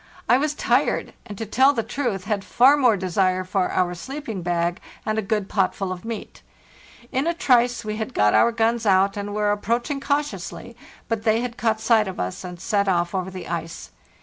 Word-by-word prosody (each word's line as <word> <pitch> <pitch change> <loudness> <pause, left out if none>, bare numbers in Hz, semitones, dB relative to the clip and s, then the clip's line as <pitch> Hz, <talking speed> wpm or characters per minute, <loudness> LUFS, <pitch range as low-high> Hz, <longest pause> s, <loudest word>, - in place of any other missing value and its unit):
I 250 - +5
was 300 +1 -1
tired, - - +1
and, 205 - -8
to 225 - -4
tell 260 +6 +4
the 230 -4 -1
truth, 225 -4 -3
had 205 -1 -2
far 260 +7 +5
more 250 -7 +3
desire 185 0 +1
for 185 0 0
our 180 -1 +1
sleeping 230 - -6
bag 175 0 -1 0.3
and 215 0 0
a - - +1
good 210 -1 -1
potful 195 -1 0
of 180 -1 -6
meat. 225 -1 -7 0.7
Ina 315 +6 0
trice 245 -6 +2
we 215 0 -3
had 220 - -5
got 105 0 +3
our 235 - +5
guns 230 0 0
out, 195 0 +4
and 205 0 -4
were 210 -1 +1
approaching 235 +7 -1
cautiously; 275 -6 -3 0.3
but 225 -2 -1
they 220 +1 +2
had 245 -1 -4
caught 220 +1 0
sight 225 -1 +3
of 190 - -6
us, 90 - -4
and 180 -1 -8
set 200 +1 0
off 175 -2 +1
over 190 -1 -2
the 185 -1 -8
ice. 165 -1 -5
210 Hz, 200 wpm, -23 LUFS, 185-235 Hz, 0.7 s, I